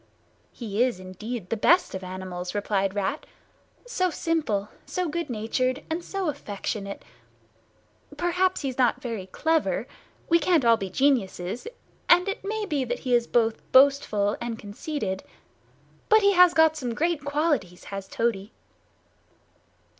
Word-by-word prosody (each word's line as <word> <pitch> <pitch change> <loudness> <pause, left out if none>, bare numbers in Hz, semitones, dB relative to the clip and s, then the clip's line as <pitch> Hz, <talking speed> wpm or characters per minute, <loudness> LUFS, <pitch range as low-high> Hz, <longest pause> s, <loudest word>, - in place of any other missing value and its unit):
"He 220 -2 -3
is 250 -7 -1
indeed 185 +2 -7
the - - +2
best 345 - +3
of 190 0 -5
animals," 185 0 -6
replied 200 -1 0
Rat. 205 +9 -2 0.6
"So 375 -7 0
simple, 300 - -1
so 365 -1 -2
good 335 -1 -3
natured, 255 +4 -1
and 335 +2 -2
so 390 -1 -3
affectionate. 200 -6 -4 1.1
Perhaps 365 +2 +1
he's 265 -2 -4
not 250 - +3
very 225 -6 -5
clever—we 320 - -1
can't 320 -4 +2
all 230 0 +7
be 195 -3 -5
geniuses; 230 - 0 0.4
and 355 +2 +6
it 395 - -3
may 425 +1 -2
be 295 -8 -1
that 245 0 -3
he 255 -2 -1
is 235 -1 +3
both 225 -2 +1
boastful 260 -7 +4
and 235 -1 -3
conceited. 205 - -4 0.9
But 435 0 +6
he 400 0 +4
has 360 -1 +6
got 320 -1 +5
some 250 -6 -3
great 330 -1 0
qualities, 285 - -1
has 195 -1 -5
Toady." 215 -1 -2
250 Hz, 140 wpm, -26 LUFS, 205-325 Hz, 1.1 s, all